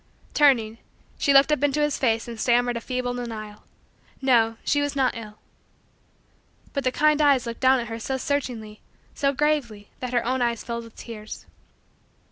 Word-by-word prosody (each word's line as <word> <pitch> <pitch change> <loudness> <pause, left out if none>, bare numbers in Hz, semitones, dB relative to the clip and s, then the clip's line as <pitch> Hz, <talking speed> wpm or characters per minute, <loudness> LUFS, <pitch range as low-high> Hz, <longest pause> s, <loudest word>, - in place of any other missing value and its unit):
Turning, 235 -6 +3 0.4
she 280 - +2
looked 275 +2 +6
up 300 -2 +1
into 290 0 +2
his 295 -1 0
face 230 -3 +1
and 230 -2 -7
stammered 245 +1 +2
a 235 - -3
feeble 250 0 -3
denial. 215 -4 -7 0.5
No, 230 -4 +3
she 290 - +2
was 285 0 -2
not 265 -2 +1
ill. 215 -2 -9 1.4
But 280 - -2
the 255 - +1
kind 305 +2 +3
eyes 280 -4 +4
looked 235 0 -6
down 260 0 +5
at 235 - -3
her 225 0 -5
so 265 +4 -2
searchingly, 245 -6 -3 0.3
so 275 -1 +1
gravely, 265 -8 -1
that 250 -1 -4
her 240 - +1
own 255 +1 0
eyes 235 -2 0
filled 235 0 -5
with 230 - -15
tears. 220 -2 -9
245 Hz, 175 wpm, -24 LUFS, 230-275 Hz, 1.4 s, looked